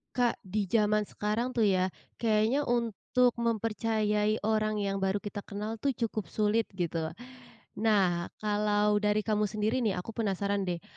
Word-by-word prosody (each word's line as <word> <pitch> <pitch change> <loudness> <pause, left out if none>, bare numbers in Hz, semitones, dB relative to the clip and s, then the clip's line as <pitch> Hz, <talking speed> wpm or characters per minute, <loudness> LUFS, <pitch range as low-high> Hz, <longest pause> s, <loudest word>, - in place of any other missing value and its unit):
Kak, 245 -2 +2
di 200 +1 -2
jaman 210 0 +2
sekarang, 230 +5 -2
tuh, 230 - +3
ya, 185 -3 +3 0.3
kayaknya 230 +5 +2
untuk 240 +1 +2
mempercayai 215 -2 0
orang 215 0 +1
yang 200 -1 -1
baru 195 +1 0
kita 205 0 -5
kenal, 210 +2 -5
tuh, 275 0 0
cukup 220 -3 -2
sulit 215 +1 +1
gitu. 165 -3 -2 0.6
Nah, 195 -6 +2 0.2
kalau 210 0 +2
dari 210 0 +1
kamu 210 -1 +1
sendiri, 215 +5 0
nih, 220 -6 +1
aku 180 +5 -5
penasaran, 200 -2 -1
deh. 175 -2 -3
210 Hz, 150 wpm, -30 LUFS, 200-225 Hz, 0.6 s, tuh